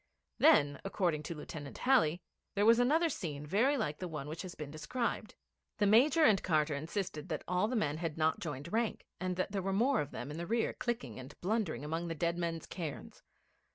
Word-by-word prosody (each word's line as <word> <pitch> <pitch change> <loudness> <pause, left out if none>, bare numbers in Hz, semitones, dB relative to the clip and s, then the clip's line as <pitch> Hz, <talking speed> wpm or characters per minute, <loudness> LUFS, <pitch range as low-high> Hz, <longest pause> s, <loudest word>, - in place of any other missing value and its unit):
Then, 145 0 +5
according 180 -6 0
to 165 +3 -5
Lieutenant 150 -1 -8
Halley, 180 - +3 0.3
there 205 +1 +3
was 230 +1 +7
another 310 +8 +4
scene 150 - -4
very 235 - +2
like 150 - -2
the 185 - -3
one 150 -4 -5
which 160 +2 -5
has 185 -2 -7
been 150 -2 -7
described. 215 +8 -3 0.4
The 210 - +2
Major 265 +10 +5
and 210 -9 +5
Carter 155 -3 +2
insisted 160 +2 -4
that 155 - -3
all 180 +3 +2
the 250 - -2
men 155 -9 0
had 165 -2 -3
not 160 0 +2
joined 150 +1 -5
rank, 230 0 0
and 185 0 -2
that 185 +2 -1
there 200 -1 -1
were 195 +1 -1
more 245 +8 +3
of 145 - -4
them 140 +1 -6
in 150 - -6
the 170 - -4
rear 230 +1 +1
clicking 140 - -3
and 130 +3 -11
blundering 180 - -1
among 165 +3 -2
the 165 - -3
dead 170 +2 0
men's 170 -2 -3
cairns. 165 -6 -6
175 Hz, 210 wpm, -33 LUFS, 150-215 Hz, 0.4 s, was